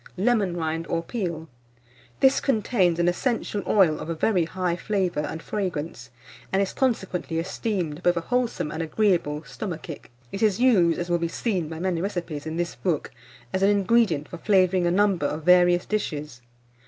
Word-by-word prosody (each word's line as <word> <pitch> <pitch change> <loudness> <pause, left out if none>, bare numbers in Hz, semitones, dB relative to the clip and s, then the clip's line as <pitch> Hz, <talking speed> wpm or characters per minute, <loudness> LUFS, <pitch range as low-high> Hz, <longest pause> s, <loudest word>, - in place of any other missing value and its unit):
LEMON 200 -3 +1
RIND 165 0 -2
OR 165 0 -1
PEEL. 170 -7 -4 0.7
This 265 0 +5
contains 215 - +1
an 175 0 +2
essential 210 +2 -1
oil 180 -7 +4
of - - -6
a 165 - -2
very 180 0 +2
high 180 0 -2
flavour 185 -3 -1
and 150 +2 -4
fragrance, 165 -10 -4 0.4
and 190 - +2
is 195 -1 0
consequently 190 -10 -1
esteemed 180 -2 -2
both 175 -1 +2
a - - 0
wholesome 240 -6 -1
and 160 - -4
agreeable 165 -3 0
stomachic. 170 - -7 0.2
It 195 - -5
is 210 -2 +2
used, 195 -10 +4
as 175 0 -3
will 175 - +2
be 170 - 0
seen 180 -3 -2
by 160 - -6
many 175 -1 -1
recipes 170 -6 -4
in 160 +1 -4
this 175 0 -2
book, 170 -6 -2 0.4
as 190 - 0
an 195 - +5
ingredient 200 -6 +2
for 175 - -9
flavouring 185 -3 +3
a - - +3
number 190 -5 +2
of 150 +2 -4
various 175 0 +5
dishes. 150 -11 -3
175 Hz, 175 wpm, -25 LUFS, 165-200 Hz, 0.7 s, This